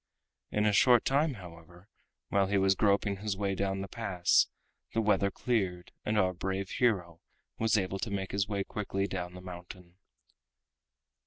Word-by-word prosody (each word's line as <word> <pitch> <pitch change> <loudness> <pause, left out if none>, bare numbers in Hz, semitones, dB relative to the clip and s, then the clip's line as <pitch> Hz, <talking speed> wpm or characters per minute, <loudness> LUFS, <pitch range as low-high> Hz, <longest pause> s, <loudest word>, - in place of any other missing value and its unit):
In 105 0 +1
a 105 - +3
short 120 +2 +5
time, 140 +1 +2
however, 85 -1 -13 0.4
while 100 -1 +2
he 100 +1 +1
was 95 0 +4
groping 100 0 +2
his 100 -1 -3
way 100 -1 0
down 95 0 -1
the 100 - -5
pass, 95 -6 +2 0.5
the - - +3
weather 100 -2 +3
cleared, 95 -6 -1
and 105 0 0
our 95 -2 +3
brave 95 +2 -3
hero 90 -9 0 0.4
was 110 -1 +3
able 95 0 -1
to 115 - -2
make 95 -1 -3
his 100 +1 0
way 100 -2 -1
quickly 95 -1 -2
down 90 -2 -4
the 90 - -9
mountain. 90 0 -10
95 Hz, 165 wpm, -31 LUFS, 90-105 Hz, 0.5 s, short